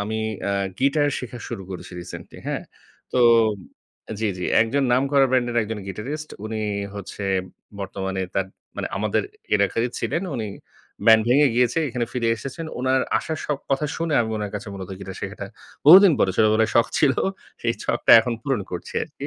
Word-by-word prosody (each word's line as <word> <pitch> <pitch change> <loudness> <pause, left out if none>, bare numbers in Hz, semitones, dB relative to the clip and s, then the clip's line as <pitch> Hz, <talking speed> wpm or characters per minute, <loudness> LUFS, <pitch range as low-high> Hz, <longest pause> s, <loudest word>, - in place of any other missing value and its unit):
আমি 110 +2 -2 0.2
অ্যা 100 - -1 0.3
গিটার 145 +2 +2
শেখা 125 -1 -7
শুরু 95 - -5
করেছি 90 0 -8
রিসেন্টলি। 85 - -10
হ্যাঁ? - - -2 0.5
তো - - +1 1.0
জি, 110 - +1
জি। 90 - -3 0.2
একজন 130 +5 0
নাম 125 +2 +4
করা 140 -1 +5
ব্যান্ডের 120 -2 +1
একজন 110 0 -4
গিটারিস্ট। 135 - -5 0.2
উনি 110 0 -3 0.3
হচ্ছে 100 0 -7 0.6
বর্তমানে 95 0 -3
তার 95 -1 0 0.3
মানে - - -3
আমাদের - - 0 0.3
এলাকারই 105 +4 +1
ছিলেন 170 - -1
উনি 110 -3 -3 0.6
ব্যান্ড 110 -1 +8
ভেঙে 140 +4 +5
গিয়েছে 125 +3 +2
এখানে 120 -1 -2
ফিরে 120 -2 0
এসেছেন। 150 +7 -6
উনার 130 +1 +2 0.2
আসার 160 -2 -4 0.3
কথা 135 +2 +1
শুনে 165 -2 -1
আমি 110 -1 -1
উনার 105 -1 -3
কাছে 105 +2 -5
মূলত 95 -1 -7
গিটার 95 0 -8
শেখাটা 100 0 -5 0.4
বহুদিন 185 +3 +10
পরে 95 - +3
ছোটবেলায় 110 0 +3
শখ 115 - +5
ছিল, 140 -3 +4 0.5
সেই - - +1
ছকটা - - +1
এখন 120 - -2
পূরণ 135 -6 0
করছি 90 - -6
আরকি। - - -7
115 Hz, 165 wpm, -23 LUFS, 100-135 Hz, 1.0 s, বহুদিন